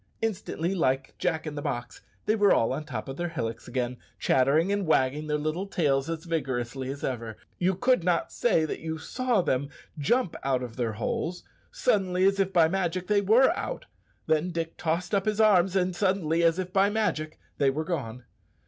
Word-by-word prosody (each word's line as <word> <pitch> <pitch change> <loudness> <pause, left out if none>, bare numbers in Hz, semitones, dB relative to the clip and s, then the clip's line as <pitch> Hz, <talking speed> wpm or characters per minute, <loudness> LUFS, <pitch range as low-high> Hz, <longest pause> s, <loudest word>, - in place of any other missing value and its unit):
Instantly, 190 -5 -2
like 135 -7 0
Jack 160 -3 -1
in 155 - -4
the 145 - -5
box, 120 -3 -4 0.2
they 215 - +2
were 205 -2 +4
all 115 - +3
on 140 - -3
the 155 - -13
top 130 - -4
of 135 +1 -6
their 175 0 -2
hillocks 115 -9 -4
again, 125 -1 -2 0.2
chattering 145 +8 +3
and 200 -3 0
wagging 150 0 +2
their 150 0 +1
little 155 +6 -2
tails 145 -6 +1
as 165 0 -4
vigorously 130 -5 -2
as 140 +1 -6
ever. 115 -4 -3 0.2
You 185 +1 +2
could 245 0 +2
not 175 -1 +1
say 185 -9 +2
that - - -4
you 160 0 -4
saw 240 +4 0
them 135 0 0 0.3
jump 210 - +1
out 130 -1 0
of 120 -2 -7
their 115 -3 -1
holes. 160 +10 -3 0.3
Suddenly, 190 -6 +1
as 195 0 +3
if 195 -1 +1
by 170 -4 +5
magic, 185 0 -1
they 205 +1 +2
were 225 +7 +5
out; - - -4 0.4
then 160 +3 +1
Dick 165 -1 -3
tossed 170 +3 -2
up 195 -1 +2
his 215 0 0
arms, 195 -4 +4
and 185 -1 +1
suddenly, 175 -4 +1
as 165 0 +3
if 185 0 -4
by 195 +1 +4
magic, 185 -8 -1 0.2
they 140 - +4
were 155 +4 -2
gone! 130 -8 -4
165 Hz, 200 wpm, -27 LUFS, 135-190 Hz, 0.4 s, by